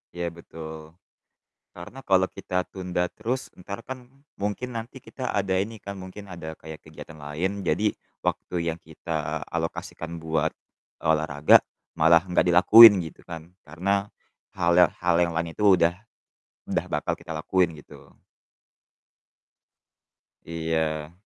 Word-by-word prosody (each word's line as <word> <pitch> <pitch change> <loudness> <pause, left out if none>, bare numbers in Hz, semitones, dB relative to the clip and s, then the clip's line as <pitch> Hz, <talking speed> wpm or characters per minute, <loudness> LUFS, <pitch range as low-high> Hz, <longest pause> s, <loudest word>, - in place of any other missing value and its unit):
Iya 85 0 -3
betul, 80 -2 -10 0.9
karena 85 +10 -9
kalau 95 -1 +5
kita 90 0 -2
tunda 90 -2 -2
terus 130 +3 -4
entar 100 +5 -8
kan 130 -2 -8 0.3
mungkin 105 +5 -2
nanti 115 +3 -6
kita 130 0 -6
ada 95 -1 0
ini 110 +3 -4
kan 100 -1 -8
mungkin 95 +2 -9
ada 85 -4 -8
kayak 80 -1 -10
kegiatan 80 0 -11
lain 90 +8 -3
jadi 100 +5 +1 0.3
waktu - - -2 0.2
yang 85 - -9
kita 80 -1 -4
alokasikan 80 0 -5
buat, 80 -1 0 0.6
olahraga, 75 -2 +5 0.4
malah 85 +2 +6
gak - - +3
dilakuin 100 +5 +10
gitu 80 - -10
kan 85 +1 -9
karena, 100 +6 -1 0.5
hal 85 -2 +2
yang 90 - +6
hal 85 -1 +1
yang 85 -1 +1
lain 85 0 -2
itu 105 - -3
udah 85 -1 +3 0.7
udah - - -2
bakal - - -1
kita - - -6
lakuin 90 -4 +1
gitu. 75 - -15 2.4
Iya. 80 -2 -2
85 Hz, 130 wpm, -25 LUFS, 80-100 Hz, 2.4 s, dilakuin